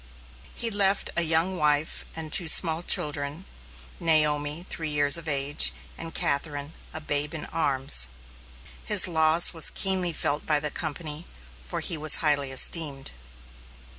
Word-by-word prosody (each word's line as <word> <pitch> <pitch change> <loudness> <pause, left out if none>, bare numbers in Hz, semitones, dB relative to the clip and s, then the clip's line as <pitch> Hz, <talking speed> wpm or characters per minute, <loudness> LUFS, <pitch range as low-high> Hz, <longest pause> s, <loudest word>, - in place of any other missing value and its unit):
He 230 -1 0
left 200 -1 0
a 170 - +2
young 165 +3 0
wife, 150 -1 -2
and 160 -1 -8
two 175 - +4
small 160 0 +3
children, 150 +1 0 0.5
Naomi, 150 0 -1
three 160 -2 -6
years 145 -1 +2
of 170 -1 -1
age, 140 0 +1 0.2
and 165 0 -9
Catherine, 145 +1 -3 0.2
a - - -7
babe 150 0 -3
in 155 - -7
arms. 135 - +4 0.8
His 210 -4 +2
loss 160 0 +4
was 165 -2 +2
keenly 185 -2 +2
felt 150 -2 -3
by 150 -2 +1
the 150 0 -3
company, 155 0 -7 0.3
for - - -6
he 165 - -4
was 155 -1 +5
highly 145 -4 0
esteemed. 140 0 0
155 Hz, 140 wpm, -24 LUFS, 145-165 Hz, 0.8 s, was